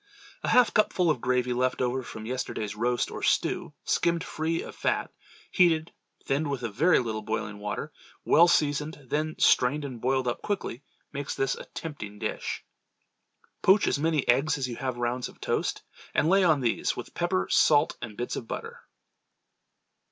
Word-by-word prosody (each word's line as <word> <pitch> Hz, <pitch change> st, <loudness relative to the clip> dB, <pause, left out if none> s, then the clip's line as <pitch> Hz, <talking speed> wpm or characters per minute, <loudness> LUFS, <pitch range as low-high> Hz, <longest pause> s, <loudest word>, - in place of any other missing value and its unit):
A -, -, -4 dB
half 250 Hz, -2 st, +5 dB
cupful 185 Hz, -5 st, +3 dB
of 130 Hz, -, -2 dB
gravy 125 Hz, 0 st, +1 dB
left 125 Hz, +1 st, 0 dB
over 125 Hz, +1 st, 0 dB
from 110 Hz, -3 st, -8 dB
yesterday's 110 Hz, -4 st, -3 dB
roast 120 Hz, +2 st, 0 dB
or -, -, -6 dB
stew -, -, 0 dB
skimmed 170 Hz, -1 st, +1 dB
free 160 Hz, +1 st, -2 dB
of -, -, -9 dB
fat, -, -, -1 dB, 0.4 s
heated, 165 Hz, -3 st, +3 dB, 0.3 s
thinned 145 Hz, +2 st, 0 dB
with 135 Hz, -3 st, -3 dB
a 115 Hz, -, -1 dB
very 165 Hz, -, +4 dB
little 110 Hz, -3 st, -2 dB
boiling 105 Hz, -1 st, -4 dB
water, 105 Hz, 0 st, -4 dB, 0.3 s
well 170 Hz, +2 st, +6 dB
seasoned, 150 Hz, -2 st, 0 dB
then 155 Hz, +1 st, -1 dB
strained 140 Hz, +4 st, +3 dB
and 125 Hz, -5 st, -7 dB
boiled 130 Hz, 0 st, +1 dB
up 120 Hz, -, -2 dB
quickly, 195 Hz, -, -3 dB, 0.3 s
makes 140 Hz, 0 st, -4 dB
this 135 Hz, -1 st, 0 dB
a -, -, -8 dB
tempting 105 Hz, -11 st, -7 dB
dish. -, -, -4 dB, 1.0 s
Poach 195 Hz, +2 st, +5 dB
as -, -, +1 dB
many 155 Hz, -2 st, +1 dB
eggs 140 Hz, +5 st, +3 dB
as 135 Hz, -2 st, -2 dB
you 120 Hz, -, -6 dB
have 130 Hz, -2 st, -3 dB
rounds 120 Hz, +1 st, -2 dB
of -, -, -17 dB
toast, -, -, -1 dB, 0.3 s
and 155 Hz, -, +3 dB
lay 190 Hz, +2 st, +5 dB
on 155 Hz, -6 st, +4 dB
these, 120 Hz, -2 st, 0 dB
with -, -, -7 dB
pepper, 175 Hz, +2 st, 0 dB
salt 145 Hz, -2 st, +4 dB
and 110 Hz, -3 st, -7 dB
bits 120 Hz, -, -3 dB
of 115 Hz, -, -6 dB
butter. -, -, -6 dB
135 Hz, 175 wpm, -27 LUFS, 120-160 Hz, 1.0 s, well